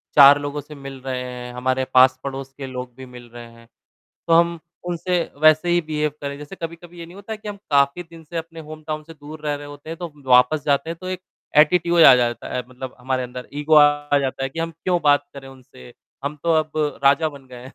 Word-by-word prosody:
4 145 0 +9
लोगों 145 0 -4
से 150 +2 -12
मिल 135 -1 -9
रहे 130 -1 -4
हैं, 125 -1 -7
हमारे 130 +1 -1
पास-पड़ोस 130 +1 +3
के 135 -1 -7
लोग 125 -1 -7
भी 130 - -10
मिल 125 -1 -13
रहे 120 0 -10
हैं, 115 0 -18 0.6
तो 165 - +1
हम 170 0 +4 0.3
उनसे 175 +1 -1 0.2
वैसे 155 +2 +5
ही 175 - +3
बिहेव 150 -2 -2
करें, 140 0 -5
जैसे 150 +6 -10
कभी-कभी 170 0 -8
ये 170 - -8
नहीं 175 - -14
होता 200 +2 -8
है - - -4
कि 210 - -9
हम 205 - -5
काफ़ी 140 +4 +3
दिन 165 -1 -15
से 170 +3 -9
अपने 165 0 -6
होम 155 0 -9
टाउन 155 0 -3
से 165 - -13
दूर 150 +1 -11
रह 145 - 0
रहे 145 0 -8
होते 145 +2 -11
हैं 165 - -5
तो 170 -4 -6 0.2
वापस 125 +4 +5
जाते 145 +3 +1
हैं 165 - -5
तो 185 - -6
एक 185 -1 -4 0.4
एटिट्यूड 170 +2 +5
आ - - +10
जाता 120 -1 -1
है 125 - -1
मतलब 130 0 -8
हमारे 130 +1 -2
अंदर, 125 0 -8
ईगो 150 +2 +1
आ 145 -1 +5
जाता 135 -1 -3
है 135 - -1
कि 165 - -9
हम 165 0 -2
क्यों 175 +2 -1
बात 145 -1 +3
करें 135 -1 -10
उनसे, 125 - -15 0.3
हम 145 +1 -3
तो 170 - +2
अब 155 0 -8 0.3
राजा 140 +3 +4
बन 140 -3 -13
गए 125 0 -11
हैं, 130 - -13
145 Hz, 240 wpm, -22 LUFS, 130-165 Hz, 0.6 s, आ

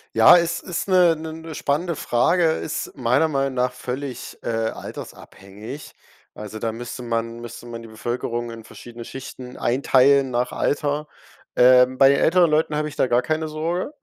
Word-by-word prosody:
Ja, 115 +10 +8
es 170 0 -1
ist 180 +2 -4
'ne 180 -3 +5
'ne 160 0 -7
'ne 160 0 -9
spannende 155 +4 -1
Frage, 155 +9 +1
ist 160 - -5
meiner 130 +5 +2
Meinung 135 -3 -1
nach 125 0 0
völlig, 125 0 -6
äh, - - -8
altersabhängig. 110 +1 -6 0.4
Also, 105 0 -8
da 115 +1 -2
müsste 120 +2 -7
man 115 0 -3
müsste 120 0 -9
man 115 -1 -8
die 115 - -10
Bevölkerung 120 +1 -4
in 115 -1 -9
verschiedene 120 +1 -11
Schichten 130 -1 -9
einteilen 135 +2 +3
nach 120 +1 -1
Alter. 145 +1 -1 0.5
Ähm, 125 +1 +5
bei 135 0 +7
älteren 170 +5 +4
Leuten 155 0 +1
habe 150 0 -1
ich 145 - -12
da - - +2
gar 120 -1 +2
keine 155 +5 -2
Sorge. 165 - -3
130 Hz, 165 wpm, -22 LUFS, 120-155 Hz, 0.5 s, Ja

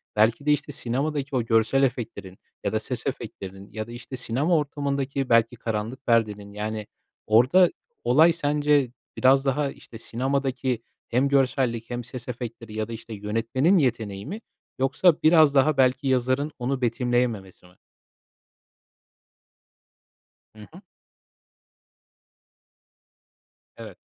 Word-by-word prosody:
belki 110 +6 +2
de, 150 - +3
işte, 150 0 0
sinemadaki 140 +2 -2
o 125 - +1
görsel 115 +4 +2
efektlerin 115 -7 -3 0.3
ya - - -1
da - - +1
ses - - -5
efektlerinin 95 +1 -6
ya 110 +1 -5
da, - - -10
işte, 120 +2 -8
sinema 135 +8 +1
ortamındaki 140 -2 -2
belki 115 +1 +3
karanlık 115 +3 -4
perdenin, 105 -3 +1
yani, 105 0 -4 0.4
orada 130 +12 +5 0.3
olay 160 +7 +5
sence 145 -4 +1 0.3
biraz 135 +1 +4
daha, 140 +1 0
işte, 115 - -13
sinemadaki 130 0 -2 0.3
hem 125 +4 +2
görsellik 130 -4 +1
hem 120 0 -4
ses 125 0 -9
efektleri 115 -2 -7
ya 110 0 -2
da, 115 - -7
işte, 115 0 -8
yönetmenin 115 - +1
yeteneği 110 - -1
mi 205 +9 -6 0.4
yoksa 145 +7 +4
biraz 155 -3 +6
daha 140 +2 +4
belki 130 +2 +2
yazarın 130 +3 +1
onu 130 +2 -2
betimleyememesi 120 -6 -1
mi? 90 - -19 2.8
Hı - - -15
hı. 180 - -12 3.0
Evet. - - -10
125 Hz, 120 wpm, -25 LUFS, 115-140 Hz, 3.0 s, biraz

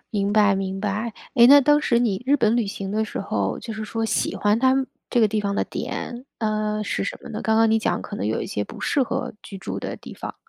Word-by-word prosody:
明 200 -1 0
白， 205 -2 +5
明 195 0 -3
白。 215 +2 -2 0.2
诶， 240 -2 +8
那 285 +2 +9
当 295 +2 +4
时 235 -5 +2
你 220 -3 0
日 285 +2 +4
本 225 -2 +2
旅 230 -4 +1
行 195 -1 -5
的 220 +1 0
时 210 - -5
候， 100 - -2
就 230 - -6
是 215 0 -5
说 225 +1 -3
喜 - - 0
欢 210 +2 +2
他 260 +1 +4
们 270 -1 0 0.2
这 240 - +2
个 220 - +6
地 215 0 0
方 200 -1 -1
的 - - 0
点， 245 +2 -5
呃， 215 -1 -1
是 - - -2
什 195 - -4
么 - - -9
呢？ 215 - -4
刚 220 0 +2
刚 225 0 +4
你 225 - +4
讲 - - -1
可 205 - -7
能 - - -2
有 110 - -1
一 - - -4
些 105 - -2
不 - - -11
适 280 - +1
合 245 - -3
居 195 - -9
住 195 - -5
的 - - -5
地 - - -11
方。 - - -7
215 Hz, 290 characters per minute, -23 LUFS, 200-235 Hz, 0.2 s, 那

